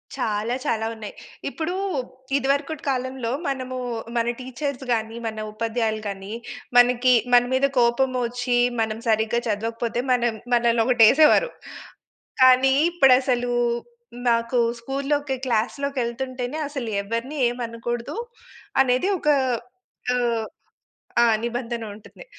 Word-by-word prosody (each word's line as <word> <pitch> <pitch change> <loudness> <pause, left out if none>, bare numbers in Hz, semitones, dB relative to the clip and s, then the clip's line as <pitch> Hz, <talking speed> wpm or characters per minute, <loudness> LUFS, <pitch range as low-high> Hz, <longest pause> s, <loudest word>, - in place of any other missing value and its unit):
చాలా, 215 +3 -1
చాలా 220 -1 0
ఉన్నయి. 220 -2 -8 0.4
ఇప్పుడూ 330 +2 -3 0.6
ఇదివరుకుటి 280 +2 -1
కాలంలో 260 -2 -2 0.2
మనమూ 255 -2 -3 0.4
మన 230 0 +1
టీచర్స్ 260 +1 -4
గానీ, 225 0 -2
మన 220 - -5
ఉపాధ్యాయులు 220 0 -1
కానీ, 195 +1 -7 0.5
మనకి 250 +1 +5 0.2
మన 245 0 +7
మీద 275 +2 +3
కోపమొచ్చీ, 245 0 +1 0.2
మనం 220 0 -2
సరిగ్గా 220 +1 +2
చదవకపోతే, 230 +2 -2
మనం 240 -2 +2 0.2
మనలనొకటేసేవారు. 240 - +5 0.9
కానీ, 260 +1 +6 0.2
ఇప్పుడసలూ 255 -6 +3 0.8
నాకు 230 +1 +1 0.2
స్కూల్‌లోకి, 275 +2 -1
క్లాస్‌లోకెళ్తుంటేనే 255 +2 -2
అసలు 270 -5 -5
ఎవరిని 230 +8 -4
ఏమనకూడదు, 240 - -4 0.7
అనేది 260 +9 +2
ఒకా 300 -1 +3 0.8
ఆహ్ 235 -3 0 0.8
ఆ! - - +6 0.2
నిబంధన 235 -1 -3
ఉంటుంది. 215 - -14
245 Hz, 95 wpm, -23 LUFS, 230-265 Hz, 0.9 s, మన